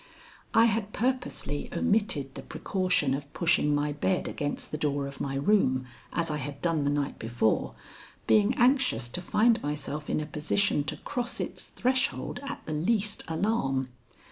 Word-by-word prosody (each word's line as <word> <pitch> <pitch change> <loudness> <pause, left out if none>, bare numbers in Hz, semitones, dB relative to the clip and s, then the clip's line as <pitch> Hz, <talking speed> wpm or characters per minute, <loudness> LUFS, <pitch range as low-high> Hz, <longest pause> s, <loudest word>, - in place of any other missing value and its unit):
I 225 - +7
had 215 -2 0
purposely 245 - -1
omitted 205 - +1
the 135 - -7
precaution 180 -2 0
of 140 +1 -4
pushing 165 -4 +3
my 145 0 0
bed 180 +5 0
against 145 -1 -4
the 150 - -2
door 145 -2 0
of 140 -1 -7
my 135 -1 -2
room, 135 -5 +2 0.3
as 165 -2 -1
I 150 - -1
had 140 0 -5
done 165 -4 +1
the - - +3
night 145 -1 -1
before, 115 -1 0 0.5
being 215 +3 +4
anxious 250 - +3
to 180 - -3
find 225 +5 +3
myself 150 +1 -4
in - - +1
a 155 - -2
position 150 +2 +1
to - - -3
cross 240 -1 -3
its - - -3
threshold 260 +1 -1
at 280 - -6
the 155 - -4
least 205 +6 0
alarm. 160 - 0
155 Hz, 165 wpm, -28 LUFS, 140-210 Hz, 0.5 s, I